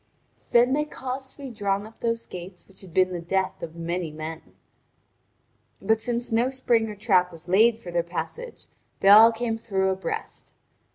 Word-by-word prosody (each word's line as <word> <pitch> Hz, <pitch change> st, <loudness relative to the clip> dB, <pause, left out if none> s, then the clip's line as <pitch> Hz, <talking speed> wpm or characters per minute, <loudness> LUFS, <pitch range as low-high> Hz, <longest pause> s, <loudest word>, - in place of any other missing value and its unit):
Then 245 Hz, +2 st, +4 dB
they 300 Hz, +1 st, +2 dB
caused 265 Hz, -2 st, -6 dB
to -, -, -33 dB
be 275 Hz, -3 st, -7 dB
drawn 200 Hz, -2 st, -1 dB
up 220 Hz, +1 st, -15 dB
those 230 Hz, 0 st, -2 dB
gates 180 Hz, 0 st, -10 dB
which 195 Hz, -, -14 dB
had 190 Hz, -3 st, -13 dB
been 185 Hz, +2 st, +2 dB
the 175 Hz, -, -4 dB
death 190 Hz, +2 st, -1 dB
of 165 Hz, 0 st, -7 dB
many 170 Hz, 0 st, -3 dB
men. 155 Hz, +1 st, -7 dB, 1.4 s
But 220 Hz, 0 st, +1 dB
since 240 Hz, 0 st, -3 dB
no 235 Hz, +3 st, +2 dB
spring 235 Hz, -4 st, +1 dB
or 210 Hz, -, -7 dB
trap 190 Hz, -4 st, +2 dB
was 165 Hz, 0 st, -12 dB
laid 220 Hz, +5 st, +4 dB
for 185 Hz, -6 st, -9 dB
their 170 Hz, 0 st, +1 dB
passage 325 Hz, -, -6 dB, 0.4 s
they 195 Hz, -, +5 dB
all 220 Hz, +3 st, +9 dB
came 225 Hz, 0 st, -3 dB
through 190 Hz, -4 st, 0 dB
abreast. 190 Hz, -2 st, -5 dB
205 Hz, 180 wpm, -25 LUFS, 180-235 Hz, 1.4 s, all